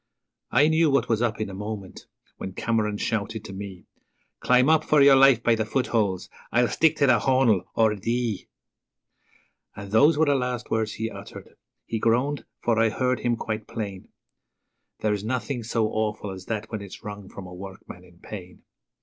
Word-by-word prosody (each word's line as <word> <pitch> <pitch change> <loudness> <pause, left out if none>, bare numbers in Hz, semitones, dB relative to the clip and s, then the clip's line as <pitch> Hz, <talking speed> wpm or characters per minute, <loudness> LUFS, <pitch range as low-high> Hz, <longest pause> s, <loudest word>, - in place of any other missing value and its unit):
I 140 +4 +4
knew 160 0 +3
what 140 0 +2
was 115 -1 +1
up 115 -2 0
in 110 - -2
a 100 - -8
moment 105 -1 -7 0.3
when 95 - -6
Cameron 105 -1 0
shouted 110 0 -2
to 95 - -8
me: 95 -2 -8 0.5
'Climb 125 +1 +4
up 155 0 +4
for 150 - +3
your 140 -1 +8
life 135 -3 +6
by 115 - +4
the 110 -1 +1
footholes. 110 -5 0 0.2
I'LL 120 0 +3
STICK 160 -1 +3
TAE 145 - +3
TH' 130 - +5
HAUN'LE 125 -8 +2
OR 110 -1 +4
DEE!' 115 0 -2 1.3
And 100 -1 -8
those 145 +8 +5
were 160 - +4
the 145 - +3
last 125 -3 -2
words 110 -1 0
he 110 0 -4
uttered. - - -11 0.3
He 115 - -3
groaned, 125 +6 +1 0.2
for 115 -2 +2
I 115 0 +4
heard 125 +3 0
him 120 -1 0
quite 110 -1 -4
plain 100 -5 -6 0.9
There's 105 -2 0
nothing 125 +2 -2
so 115 0 0
awful 105 -2 -2
as 95 -1 -9
that 110 -1 -4
when 110 -2 -4
it's 100 -2 -10
wrung 105 -2 -8
from 100 - -9
a 90 - -10
workman 95 -1 -10
in 90 -1 -19
pain. 90 -1 -10
110 Hz, 185 wpm, -25 LUFS, 105-125 Hz, 1.3 s, your